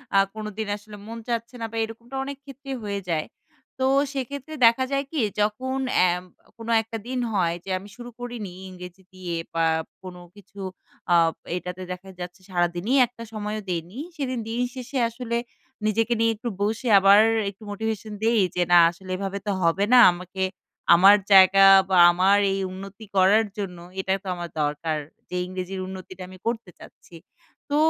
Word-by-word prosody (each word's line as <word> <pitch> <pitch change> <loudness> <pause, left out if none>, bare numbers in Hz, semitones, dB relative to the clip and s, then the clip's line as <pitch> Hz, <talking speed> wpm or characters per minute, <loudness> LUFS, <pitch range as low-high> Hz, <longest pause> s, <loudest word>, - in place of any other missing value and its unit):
আ - - +6 0.2
কোনোদিন 215 0 -5
আসলে 210 0 -12
মন 230 +1 -7
চাচ্ছে 235 +1 -3
না - - -1
বা 225 - -5
এরকমটা 230 +4 -8
অনেক 280 0 -6
ক্ষেত্রেই 275 0 -7
হয়ে 200 -1 -3
যায়। 155 -2 0 0.5
তো 260 - +1 0.3
সেইক্ষেত্রে 280 +3 -5
দেখা 235 +3 +5
যায় 275 0 +1
কি? 315 - -2 0.2
যখন 255 +6 0 0.2
অ্যা 180 - +5 0.5
কোন 230 0 -9 0.2
একটা 225 +1 -6
দিন 255 0 -2
হয় 170 -3 +1
যে - - -8
আমি 200 +2 -13
শুরু 240 +2 -9
করিনি 240 -5 -6 0.2
ইংরেজি 180 0 -11
দিয়ে 180 -2 -5 0.2
বা 165 0 +2 0.4
কোনো 180 -1 -9 0.2
কিছু 200 0 -16 0.5
আ - - +6 0.4
এইটাতে 180 +1 -5
দেখা 180 +1 -8
যাচ্ছে 180 +2 -8
সারাদিনই 175 +6 0
একটা 230 -1 -11
সময়ও 210 0 -4
দেইনি। 175 +4 -4 0.2
সেদিন 255 -4 -2
দিনের 245 +2 -1
শেষে 255 +2 -5
আসলে 235 0 -3 0.5
নিজেকে 225 +2 +1
নিয়ে 230 0 +3
একটু 235 +3 -5
বসে 220 +4 -1
আবার 195 +1 +7 0.3
একটু 200 +2 -14
মোটিভেশন 220 0 -4
দেই 225 0 +3 0.2
যে 180 - +1
না 175 - +8
আসলে 185 +2 -12
এভাবে 195 0 -3
তো - - +1
হবে 170 +4 +2
না। 250 - +9
আমাকে 185 +2 -5 0.5
আমার 195 +4 +8 0.2
জায়গা 195 0 +8 0.2
বা 185 - +3
আমার 190 +3 +4 0.2
এই 195 - -2
উন্নতি 195 +3 -9
করার 200 +4 +5
জন্য 190 -4 -4 0.2
এটা 190 0 -2
তো 195 - -10
আমার 175 -1 -6
দরকার। 150 +2 -1 0.3
যে - - -5
ইংরেজির 185 +1 -5
উন্নতিটা 185 0 -9
আমি 185 - -12
করতে 230 -4 -2
চাচ্ছি। 170 - -15 0.5
তো 290 - 0
205 Hz, 170 wpm, -24 LUFS, 185-230 Hz, 0.5 s, না